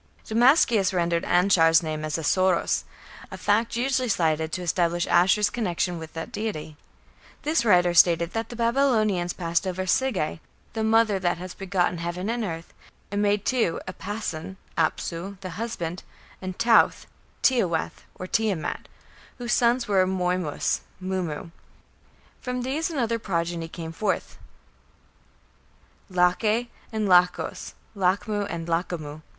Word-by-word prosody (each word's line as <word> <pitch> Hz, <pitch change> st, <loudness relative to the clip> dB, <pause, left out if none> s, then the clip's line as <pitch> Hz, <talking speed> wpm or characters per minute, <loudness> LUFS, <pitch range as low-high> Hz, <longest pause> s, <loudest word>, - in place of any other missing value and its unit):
Damascius 230 Hz, -, +4 dB
rendered 170 Hz, -1 st, +1 dB
Anshar's 175 Hz, -3 st, +4 dB
name 155 Hz, -1 st, -3 dB
as 155 Hz, +1 st, -2 dB
"Assōros", 185 Hz, +3 st, +1 dB, 0.4 s
a -, -, -8 dB
fact 225 Hz, +3 st, +1 dB
usually 255 Hz, 0 st, 0 dB
cited 160 Hz, -4 st, +1 dB
to 180 Hz, -, -3 dB
establish 175 Hz, 0 st, +1 dB
Ashur's 195 Hz, +4 st, +3 dB
connection 180 Hz, -6 st, -1 dB
with 160 Hz, -1 st, -9 dB
that 165 Hz, +8 st, -6 dB
deity. 205 Hz, -9 st, -4 dB, 0.7 s
This 305 Hz, -3 st, +1 dB
writer 180 Hz, -5 st, +4 dB
stated 170 Hz, 0 st, +4 dB
that 225 Hz, 0 st, -3 dB
the 240 Hz, -, -7 dB
Babylonians 230 Hz, -7 st, +2 dB
passed 170 Hz, +1 st, -1 dB
over 185 Hz, 0 st, -2 dB
"Sige, 185 Hz, -5 st, 0 dB, 0.3 s
the 220 Hz, -, -2 dB
mother, 220 Hz, -2 st, +3 dB
that 175 Hz, -1 st, 0 dB
has 180 Hz, +1 st, -7 dB
begotten 185 Hz, -3 st, -1 dB
heaven 175 Hz, +5 st, -3 dB
and 235 Hz, -1 st, -2 dB
earth", 165 Hz, -4 st, -6 dB, 0.4 s
and 205 Hz, 0 st, 0 dB
made 205 Hz, 0 st, +1 dB
two 235 Hz, -10 st, +1 dB
Apason 190 Hz, -2 st, -5 dB, 0.2 s
(Apsu), 170 Hz, +3 st, -2 dB
the 185 Hz, -1 st, -6 dB
husband, 180 Hz, -5 st, -4 dB, 0.4 s
and 185 Hz, -1 st, -5 dB
Tauthe 230 Hz, -1 st, +4 dB, 0.4 s
(Tiawath 185 Hz, -11 st, +1 dB
or 185 Hz, -, -6 dB
Tiamat), 200 Hz, -4 st, -1 dB, 0.5 s
whose 240 Hz, -1 st, -2 dB
son 235 Hz, 0 st, +4 dB
was 250 Hz, -2 st, -5 dB
Moymis 185 Hz, -4 st, 0 dB, 0.2 s
(Mummu). 185 Hz, -4 st, -4 dB, 0.9 s
From 250 Hz, 0 st, -3 dB
these 290 Hz, +6 st, -1 dB
another 235 Hz, -7 st, -1 dB
progeny 170 Hz, -4 st, -2 dB
came 165 Hz, -1 st, -7 dB
forth 200 Hz, +5 st, -2 dB, 1.7 s
Lache 210 Hz, +6 st, +2 dB, 0.2 s
and 215 Hz, -2 st, -1 dB
Lachos 180 Hz, -1 st, +2 dB, 0.2 s
(Lachmu 200 Hz, +2 st, 0 dB
and 165 Hz, -1 st, -5 dB
Lachamu). 165 Hz, -3 st, -3 dB
185 Hz, 130 wpm, -25 LUFS, 170-225 Hz, 1.7 s, Damascius